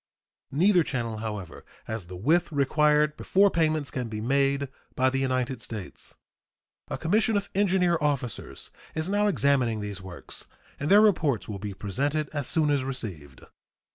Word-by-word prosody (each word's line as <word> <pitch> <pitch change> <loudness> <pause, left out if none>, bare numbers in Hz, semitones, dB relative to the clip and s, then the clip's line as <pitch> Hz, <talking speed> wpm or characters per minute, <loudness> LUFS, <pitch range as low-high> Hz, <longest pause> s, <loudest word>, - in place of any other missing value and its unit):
Neither 180 +4 +4
channel, 120 -6 -3
however, 105 -5 -6 0.2
has 110 -6 -4
the 90 - -8
width 160 - +2
required 150 +1 +3
before 200 +1 +3
payments 155 -3 +1
can 125 -3 -3
be 110 -1 -4
made 140 +4 +1 0.3
by 130 0 +3
the 135 - 0
United 130 -2 -1
States. 105 -6 -6 0.7
A - - -4
commission 215 +5 +2
of 200 0 -4
engineer 185 -4 +2
officers 140 -6 -2 0.2
is 160 +3 -1
now 205 +1 +2
examining 140 - +2
these 105 -2 -5
works, 90 -2 -8 0.3
and 145 - -2
their 205 +2 +8
reports 155 - +2
will 100 -2 -5
be 100 0 -5
presented 140 +10 -1
as 145 -4 -3
soon 155 -3 +3
as 140 -2 +1
received. 95 - -6
140 Hz, 155 wpm, -27 LUFS, 110-160 Hz, 0.7 s, their